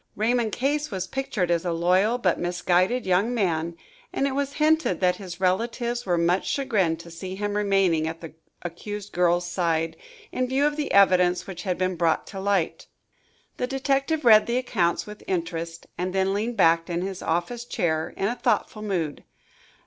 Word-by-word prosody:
Raymond 230 +1 +1
Case 290 +5 -1
was 190 -3 -3
pictured 195 -6 -2
as 170 -1 +1
a 175 - -1
loyal, 185 +7 +2
but 185 -8 +1
misguided 180 +6 +1
young 190 +6 +2
man, 170 -5 -1 0.3
and 275 - 0
it 275 - 0
was 280 +1 -2
hinted 310 - +2
that 180 -1 +2
his 185 -3 -8
relatives 235 +5 -1
were 175 -1 +2
much 170 +3 +1
chagrined 200 - 0
to 170 - -12
see 185 +3 -6
him 205 +1 -2
remaining 195 -6 +2
at 165 +1 -5
the 165 -2 -9 0.3
accused 205 +4 -6
girl's 175 0 +2
side, 165 -2 -1 0.4
in 255 0 -1
view 270 +3 +1
of 295 0 +1
the 300 -1 -3
evidence 180 -2 +4
which 180 -3 -7
had 180 -2 -2
been 185 0 0
brought 165 -1 +1
to 195 - -8
light. 195 -4 -1 0.7
The 250 - -1
detective 275 +3 0
read 215 -2 +7
the 235 +1 0
accounts 180 -9 0
with 210 0 -10
interest 165 -2 -3
and 185 +1 -2
then 190 0 +2
leaned 225 +3 -2
back 165 -2 +4
in 175 +1 -1
his 190 -1 -5
office 175 +9 -2
chair 160 -9 -1
in 195 - 0
a 235 - 0
thoughtful 215 -3 0
mood. 180 -8 -2
190 Hz, 180 wpm, -25 LUFS, 175-235 Hz, 0.7 s, read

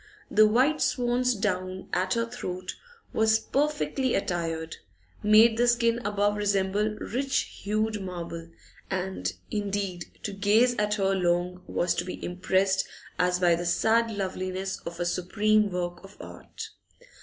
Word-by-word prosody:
The 215 0 +6
white 260 +8 +3
swan's 245 0 +1
down 185 -2 -2
at 185 +3 +1
her 230 0 +1
throat 185 -6 -5
she - - -15 0.4
was 220 0 +4
perfectly 275 0 0
attired 165 -3 -2 0.4
made 220 +2 +6
the 240 +1 +3
skin 235 -1 +3
above 205 0 +1
resemble 205 +1 +1
rich 270 +6 -1 0.2
hued 215 +1 -1
marble, 170 -2 -6 0.4
and 190 0 -2 0.2
indeed 200 -4 -2 0.2
to 205 - -3
gaze 215 +5 +3
at 210 0 +1
her 195 -2 +1
long 180 0 0
was 175 - +1
to 175 - -2
be 180 - -6
impressed 190 +2 +1 0.3
as 180 0 +2
by 175 -2 +4
the 175 +1 -1
sad 225 +6 +3
loveliness 190 -2 -3
of 170 0 -7
a 175 - 0
supreme 210 +4 +2
work 175 -1 -4
of 195 +1 -14
art. - - -9
200 Hz, 145 wpm, -27 LUFS, 180-220 Hz, 0.4 s, The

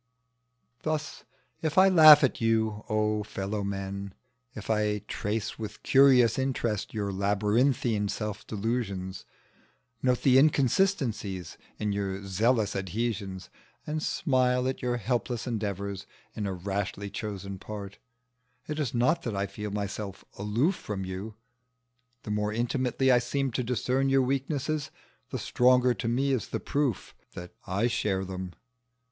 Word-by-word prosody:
Thus 155 -1 -3 0.4
if 160 +1 -2
I 190 +1 +8
laugh 155 -5 +9
at 130 - +1
you, 110 -2 +1
O 105 0 +1
fellow 100 0 -4
men! 100 0 -4 0.4
if 105 - -8
I 105 -2 0
trace 105 +2 -3
with 105 -2 -7
curious 130 -4 +5
interest 120 -5 -1
your 100 -3 -2
labyrinthine 105 +3 +1
self 105 -1 -4
delusions, 100 -4 -3 0.8
note 125 -1 +1
the 130 -1 +6
inconsistencies 135 - +1 0.2
in 105 -1 -1
your 100 -1 -3
zealous 110 +3 +1
adhesions, 95 -1 -3 0.3
and 155 +1 -2
smile 125 -4 +1
at 130 - -3
your 125 -1 0
helpless 120 +1 -2
endeavours 100 -4 -3 0.3
in 105 -2 -2
a 95 - -2
rashly 100 +2 -3
chosen 100 -2 -5
part, 100 -1 -8 0.7
it 150 0 -3
is 135 -5 -2
not 155 +8 +2
that 115 -8 -3
I 100 0 0
feel 105 +2 -6
myself 100 -1 -5
aloof 115 - +1
from 100 - -5
you: 95 +4 -6 0.9
the 105 - -5
more 105 0 0
intimately 125 +3 +1
I 125 - +6
seem 135 +2 -1
to 125 +2 -1
discern 125 +2 0
your 135 0 +4
weaknesses, 140 +3 -1 0.4
the - - -3
stronger 125 0 +3
to 110 0 -4
me 135 +4 +1
is 130 -4 0
the - - -3
proof 140 -7 -1 0.2
that 90 0 -8
I 95 +5 0
share 100 -5 0
them. 95 -1 -6
110 Hz, 140 wpm, -28 LUFS, 100-130 Hz, 0.9 s, laugh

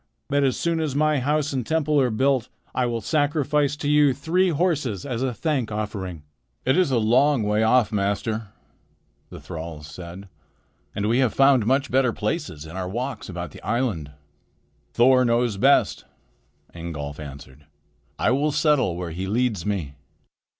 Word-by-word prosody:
But 145 0 +2
as 130 -2 +1
soon 170 -1 0
as 155 -4 -2
my 155 0 +2
house 150 +2 0
and 130 -2 -1
temple 150 +1 +1
are 130 - +2
built, 130 +1 +1 0.2
I 125 -1 +1
will 115 -1 -2
sacrifice 145 -1 +1
to 145 - -4
you 145 -2 +4
three 175 +7 +1
horses 150 - 0
as 125 -4 -3
a 130 -1 0
thank 130 -3 -1
offering." 100 -6 -4 0.4
"It 130 +2 +3
is 185 -5 +3
a 130 - +2
long 120 +4 +3
way 105 +1 +1
off, 110 0 +3
master," 105 +2 -1 0.8
the - - -10
thralls 80 -3 -7
said, 90 +5 -9 0.7
"and 105 0 -1
we 120 +3 +2
have 130 -4 +1
found 135 -5 +4
much 135 +1 +1
better 130 -1 +3
places 75 -5 -3
in 80 +2 -10
our 95 -1 -3
walks 125 +5 -4
about 90 -3 -5
the - - -13
island." 115 - -1 0.8
"Thor 130 +2 +5
knows 120 -3 +1
best," 135 +7 +3 0.7
Ingolf 75 -4 -6
answered. 70 0 -11 0.5
"I - - +2
will 145 +4 +1
settle 150 - +2
where 90 -2 -4
he 95 +4 -4
leads 110 -4 0
me." 90 -9 -2
120 Hz, 165 wpm, -24 LUFS, 100-140 Hz, 0.8 s, Thor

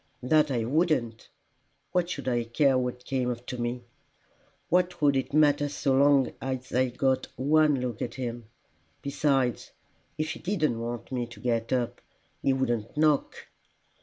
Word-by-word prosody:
'" - - -32
"That 155 -1 +5
I 120 -4 0
wouldn't! 130 -6 0 0.6
What 175 -1 +1
should 140 -6 -5
I 120 -2 +1
care 135 +4 +2
what 125 -1 -2
came 125 -2 -1
to 125 +1 -7
me? 120 +1 -3 0.8
What 180 0 +1
would 145 -2 +3
it 135 - -1
matter 145 -1 +3
so 140 -1 0
long 140 -1 +4
as 130 -1 -4
I 130 +1 +2
got 130 +2 0
one 150 +1 +3
look 120 -3 -4
at 115 - -3
him! 120 -3 -5 0.6
Besides, 135 -3 0 0.5
if 155 0 -1
he - - -7
didn't 155 - 0
want 120 +2 -5
me 125 -2 -2
to 115 -3 -13
get 115 -1 -1
up, 125 -2 -1 0.4
he 135 - +2
wouldn't 125 -3 -1
knock." 150 -2 +1
130 Hz, 160 wpm, -27 LUFS, 120-145 Hz, 0.8 s, That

